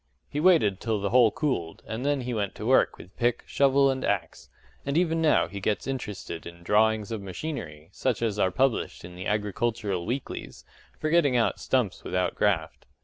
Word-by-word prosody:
He 145 - -4
waited 150 - +4
till 110 -3 -1
the 100 0 -2
hole 120 -2 +6
cooled, 100 - -2
and 110 +3 -4
then 145 -1 +1
he 125 0 -3
went 105 -3 -2
to 105 - -6
work 130 +3 +3
with 90 +4 -14
pick, 120 0 +1
shovel, 140 0 +3
and 130 -1 -3
axe: 100 -5 -2 0.3
and 140 +2 -1
even 165 -2 +2
now 155 - +4
he 100 +3 -7
gets 105 +2 -1
interested 105 -10 -5
in 85 0 -11
drawings 110 +2 +2
of 110 -3 -3
machinery, 90 - -6
such 120 +1 -1
as 105 -3 -1
are 95 - +3
published 130 -2 0
in 90 - -10
the 90 +1 -5
agricultural 105 -2 -1
weeklies, 125 +3 -5 0.3
for 155 - -1
getting 145 -7 +4
out 115 - +1
stumps 125 -8 0
without 90 0 -1
graft. - - -1
110 Hz, 190 wpm, -27 LUFS, 100-135 Hz, 0.3 s, hole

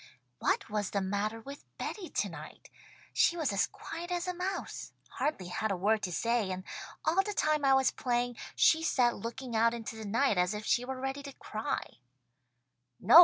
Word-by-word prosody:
"What - - +1
was 210 -2 -1
the 200 - 0
matter 205 +3 -1
with 275 +5 -9
Betty 385 -5 -4
tonight? - - -4 0.4
She 345 - +4
was 305 -10 +1
as 200 - +3
quiet 335 +1 -7
as 350 0 -1
a 360 - 0
mouse. 365 +2 -4 0.2
Hardly 190 - -2
had 220 +4 -1
a 195 - 0
word 210 +4 +2
to 180 - -2
say, 230 +2 +1
and 185 0 -3 0.4
all 355 +4 +4
the 415 +1 -4
time 305 -1 +2
I 270 -1 +6
was 265 -1 +4
playing, 245 -1 0 0.2
she 320 - +5
sat 250 -6 +3
looking 235 +3 -5
out 230 +1 +4
into 225 -1 -5
the 220 -1 -6
night 220 -1 +2
as 180 +3 +2
if 210 +1 -5
she 245 - +3
were 260 0 -4
ready 270 +2 -2
to 280 -1 -8
cry." 215 -3 -4
240 Hz, 185 wpm, -32 LUFS, 210-290 Hz, 0.4 s, I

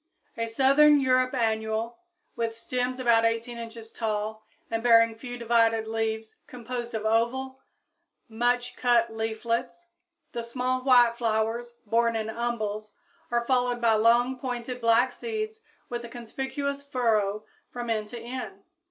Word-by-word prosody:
a 230 0 -2
southern 275 +5 +5
Europe 255 -1 +3
annual, 220 0 -1 0.4
with 230 -1 -2
stems 250 +2 -2
about 235 -2 +4
18 230 +1 -1
inches 230 -1 -9
tall 215 -1 -3 0.3
and 225 0 -1
bearing 230 -1 +5
few 245 +2 -8
divided 230 -1 +2
leaves 220 0 -3
composed 240 -1 -6
of 220 0 -3
oval, 255 +4 0 0.7
much 245 +2 0
cut 235 -2 +2
leaflets. 225 +8 -2 0.5
The 235 - -3
small 250 +2 -2
white 245 -3 +5
flowers, 230 +1 -1
borne 230 +2 +2
in 220 0 -2
umbels, 215 -3 -3 0.4
are 235 0 0
followed 245 -1 +1
by 230 -1 +3
long, 240 +4 +3
pointed, 250 -1 -4
black 230 +2 +4
seeds 440 - -5 0.3
with 240 -1 -4
a 235 - -8
conspicuous 265 +4 -4
furrow 220 -7 0 0.2
from 240 -1 -4
end 215 -1 -2
to 240 - -7
end. 230 -5 -7
235 Hz, 135 wpm, -27 LUFS, 225-250 Hz, 0.7 s, southern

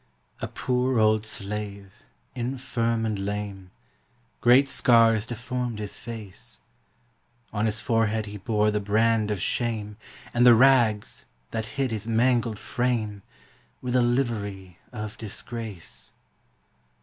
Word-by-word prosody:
A - - -3
poor 125 0 0
old 110 0 +3
slave, 100 -1 -4 0.4
infirm 120 -2 -1
and 105 -3 -1
lame; 100 -1 -4 0.7
Great 130 +3 +6
scars 115 -5 +4
deformed 120 0 -3
his 105 -1 -4
face; 110 -5 -7 0.9
On 105 +1 +1
his 110 +1 -1
forehead 115 -2 +1
he 105 0 -7
bore 105 +1 +1
the 105 - 0
brand 110 +1 +2
of 105 -2 -1
shame, 105 0 -2 0.4
And 120 - +3
the 120 -1 +9
rags, 120 -4 +3 0.2
that 110 -1 -3
hid 135 -3 0
his 110 0 -4
mangled 115 -1 +2
frame, 115 -5 -1 0.6
Were 125 - -4
the 125 0 +4
livery 105 -7 -1
of 105 -3 -6
disgrace. 110 -3 -6
110 Hz, 120 wpm, -26 LUFS, 105-120 Hz, 0.9 s, the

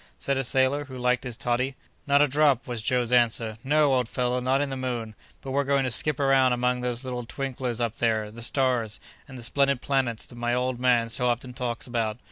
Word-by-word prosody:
said 140 - -1
a 135 - 0
sailor 135 +3 +1
who 130 -2 -9
liked 125 0 +1
his 125 -3 -5
toddy. 130 0 -1 0.3
"Not 140 +1 +5
a - - +3
drop!" 140 -2 +2
was 120 -3 -4
Joe's 125 0 0
answer. 115 -2 +2
"No! 145 0 +3
old 125 -3 +1
fellow, 125 0 0
not 130 +2 +1
in 145 -1 -1
the - - -2
moon. 120 -4 -3 0.3
But 135 - -5
we're 140 +1 +1
going 140 0 +2
to 130 - -1
skip 150 +4 +1
round 135 -2 +4
among 125 0 0
those 125 0 -3
little 125 -1 -4
twinklers 125 -1 -4
up 115 -2 -1
there—the 110 -1 -1
stars—and 125 +1 -1
the 120 - -9
splendid 140 +2 +1
planets 130 -5 0
that 120 - -14
my 120 0 0
old 125 0 -1
man 120 -2 +3
so 125 +2 0
often 125 +1 -2
talks 120 -1 -4
about. 115 -3 -2
125 Hz, 215 wpm, -26 LUFS, 120-135 Hz, 0.3 s, Not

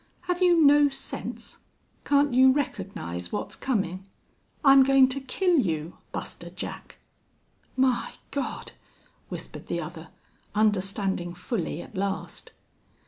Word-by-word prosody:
Have 360 0 -2
you 350 -2 +5
no 290 -1 +6
sense? 270 -1 -6 0.5
Can't 285 -2 +3
you 260 +1 +7
recognize 185 - -3
what's 105 - -3
comin'?... 195 -6 -2 0.6
I'm 275 0 +8
goin' 270 0 +6
to 275 +1 -2
kill 345 +6 +2
you, 165 - -2
Buster - - -6
Jack!" - - -7 0.8
"My 260 -2 +2 0.2
God!" 280 -2 -4 0.6
whispered - - -7
the - - -2
other, - - -7 0.5
understanding 195 -4 0
fully 180 - -3
at - - -15
last. 195 +1 -4
255 Hz, 115 wpm, -26 LUFS, 190-280 Hz, 0.8 s, I'm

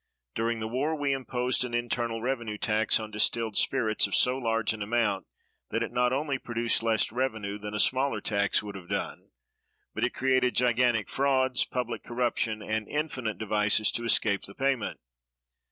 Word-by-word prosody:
During 115 +1 0
the 110 - -3
war 135 +7 0
we 145 -2 0
imposed 125 -1 -1
an 120 -1 -3
internal 120 -1 -1
revenue 120 -5 -2
tax 110 +1 +2
on 110 -1 -6
distilled 110 +1 0
spirits 110 -6 +2
of 100 - -1
so 125 +1 +3
large 115 -4 0
an 110 - -8
amount 105 -2 0 0.4
that 115 - 0
it 115 - -4
not 125 0 +2
only 140 0 -1
produced 120 -1 0
less 115 -2 +1
revenue 110 -5 -2
than 105 0 -6
a - - 0
smaller 130 -1 +3
tax 100 0 +1
would 105 -1 -6
have 95 -3 -10
done, 100 -1 -3 0.6
but - - -3
it - - 0
created 130 -1 +2
gigantic 120 -3 +3
frauds, 130 -2 +2
public 125 -2 -3
corruption, 120 -3 -1
and 110 0 -2
infinite 130 -8 -2
devices 105 0 +2
to 120 - -3
escape 105 -3 +2
the 100 - -12
payment. 135 -3 -1
115 Hz, 170 wpm, -28 LUFS, 110-125 Hz, 0.6 s, so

